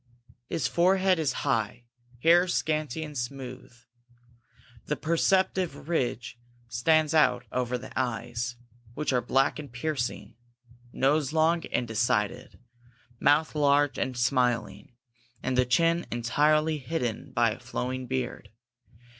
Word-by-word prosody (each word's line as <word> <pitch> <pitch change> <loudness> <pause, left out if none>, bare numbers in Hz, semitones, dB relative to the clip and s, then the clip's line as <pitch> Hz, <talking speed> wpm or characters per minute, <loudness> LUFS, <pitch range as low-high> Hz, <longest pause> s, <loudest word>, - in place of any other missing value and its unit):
His 160 -6 0
forehead 185 +5 +3
is 150 -4 +1
high, 115 +2 -1 0.4
hair 175 +2 +6
scanty 155 -3 -1
and 150 -1 -8
smooth, 130 0 -6 1.2
the 150 - 0
perceptive 185 +2 0
ridge 120 -7 -2 0.3
stands 155 +6 +2
out 125 -6 +3
over 125 0 -1
the 125 - -10
eyes, 120 0 -2 0.4
which 150 -3 -1
are 125 - +2
black 135 +4 +1
and 145 -4 -8
piercing, 125 0 -3 0.6
nose 145 +2 +1
long 165 +1 +2
and 120 - -1
decided, 115 +2 -1 0.6
mouth 150 +2 +3
large 145 -2 +2
and 130 -1 -2
smiling, 125 -3 0 0.5
and 130 - -1
the 125 0 +3
chin 165 +6 +2
entirely 150 +6 +2
hidden 125 -5 -3
by - - +2
a - - -7
flowing 130 0 -4
beard. 125 -5 -4
135 Hz, 120 wpm, -27 LUFS, 125-155 Hz, 1.2 s, hair